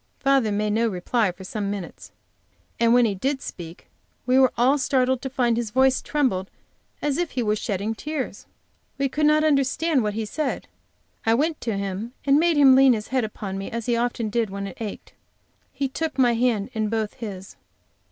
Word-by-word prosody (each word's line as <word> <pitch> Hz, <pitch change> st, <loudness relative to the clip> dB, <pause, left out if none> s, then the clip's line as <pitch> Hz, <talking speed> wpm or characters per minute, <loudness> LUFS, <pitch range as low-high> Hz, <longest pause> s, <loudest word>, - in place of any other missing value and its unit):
Father 270 Hz, -5 st, +2 dB
made 210 Hz, +1 st, 0 dB
no 230 Hz, +2 st, +2 dB
reply 210 Hz, +2 st, 0 dB
for 190 Hz, +2 st, -12 dB
some 200 Hz, +1 st, -4 dB
minutes, 200 Hz, -4 st, -7 dB, 0.7 s
and 230 Hz, 0 st, +4 dB
when 245 Hz, 0 st, +5 dB
he 210 Hz, -, +1 dB
did 265 Hz, +8 st, -1 dB
speak 170 Hz, -8 st, -9 dB, 0.4 s
we 255 Hz, +1 st, +4 dB
were 260 Hz, -2 st, +5 dB
all 260 Hz, +5 st, +3 dB
startled 260 Hz, -2 st, +1 dB
to 265 Hz, -, -4 dB
find 250 Hz, -3 st, +1 dB
that -, -, -1 dB
his 235 Hz, -2 st, -3 dB
voice 260 Hz, +3 st, +3 dB
trembled 235 Hz, -11 st, -1 dB, 0.5 s
as 290 Hz, +1 st, 0 dB
if 350 Hz, -2 st, -2 dB
he 250 Hz, -, -1 dB
were 210 Hz, -1 st, +1 dB
shedding 205 Hz, 0 st, -2 dB
tears. 295 Hz, +3 st, -5 dB, 0.5 s
We 275 Hz, 0 st, +1 dB
could 300 Hz, +3 st, +1 dB
not 305 Hz, 0 st, +4 dB
understand 290 Hz, 0 st, +2 dB
what 210 Hz, -2 st, -2 dB
he 220 Hz, 0 st, -2 dB
said. 295 Hz, +6 st, -3 dB, 0.6 s
I 225 Hz, 0 st, +3 dB
went 305 Hz, +5 st, 0 dB
to 225 Hz, -4 st, -2 dB
him 200 Hz, +4 st, -4 dB
and 280 Hz, +1 st, +5 dB
made 335 Hz, -1 st, +2 dB
him 270 Hz, -2 st, +7 dB
lean 265 Hz, -1 st, +6 dB
his 215 Hz, -2 st, -4 dB
head 260 Hz, -1 st, +1 dB
upon 200 Hz, -3 st, -5 dB
me 195 Hz, -, -5 dB
as 230 Hz, -1 st, -4 dB
he 240 Hz, -, +1 dB
often 235 Hz, -2 st, -1 dB
did 230 Hz, -2 st, 0 dB
when 200 Hz, +1 st, -5 dB
it 195 Hz, +3 st, -9 dB
ached. 215 Hz, -2 st, -7 dB, 0.6 s
He 275 Hz, +1 st, -2 dB
took 315 Hz, +3 st, -4 dB
my 245 Hz, -3 st, +4 dB
hand 230 Hz, -4 st, 0 dB
in 215 Hz, -1 st, -1 dB
both 220 Hz, -1 st, -2 dB
his. 200 Hz, -6 st, -8 dB
235 Hz, 200 wpm, -24 LUFS, 210-270 Hz, 0.7 s, him